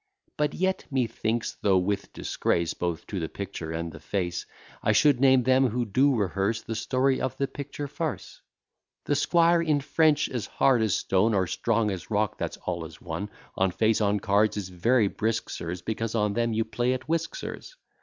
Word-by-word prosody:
But 150 -1 0
yet, 190 +1 0
methinks, 120 -3 -1
though 95 -2 +4
with 100 +2 -1
disgrace 85 -1 -1
Both 85 -2 -3
to 100 - -4
the 80 -2 -3
picture 95 -5 -6
and 85 0 -3
the 80 - -11
face, 90 -2 -3 0.3
I - - +2
should 145 -4 +4
name 130 -1 +5
them 130 +1 +4
who 120 +2 -1
do 130 +6 +3
rehearse 100 +1 0
The 115 - -4
story 130 +4 +1
of 130 - -2
the 140 - 0
picture 145 +1 -6
farce; 150 +1 -5 0.6
The - - +1
squire, 170 +3 +4
in 155 -3 +2
French 150 +1 +2
as 120 -4 -4
hard 130 -4 +3
as 110 -4 +2
stone, 105 +4 +2
Or 95 -2 +2
strong 110 +4 0
as 95 -2 -6
rock, 105 -2 0
that's - - -3
all 85 -2 -2
as 80 0 -10
one, 85 +4 -5 0.3
On 95 0 +2
face 110 +4 +1
on 105 0 +2
cards 105 +1 +2
is 95 -3 -4
very 110 +5 +2
brisk, 110 +3 -2
sirs, 85 +1 -5
Because 115 +2 -3
on 105 -2 +1
them 115 +1 0
you 110 0 0
play 120 +3 0
at 130 +1 -5
whisk, 165 0 -1
sirs. - - -7
110 Hz, 195 wpm, -27 LUFS, 95-130 Hz, 0.6 s, name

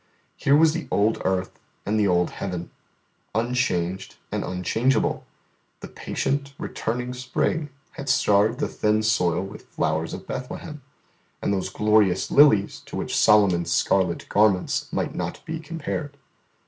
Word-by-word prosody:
Here 140 - +3
was 160 0 +5
the 165 -4 -4
old 105 +2 +1
earth 95 0 -1 0.3
and 110 +2 0
the 105 - +3
old 90 -1 +2
heaven, 90 -3 -5 0.6
unchanged 105 -6 -1 0.2
and - - -2
unchangeable; 110 +8 0 0.5
the - - -7
patient, 140 0 -3
returning 125 +2 -3
spring 130 +4 -1 0.2
had 140 -1 -7
starred 110 -1 +3
the - - -1
thin 105 0 0
soil 95 -6 +1
with 95 +2 -10
flowers 80 +1 -1
of - - -10
Bethlehem, 145 +4 -6 0.6
and 100 - 0
those 95 -2 -2
glorious 105 -3 +2
lilies 125 -9 +5
to - - -8
which - - -3
Solomon's 90 -5 +4
scarlet 90 -2 +1
garments 100 -3 +2
might - - -2
not - - -5
be 160 0 -4
compared. 155 -2 -5
110 Hz, 135 wpm, -24 LUFS, 95-135 Hz, 0.6 s, was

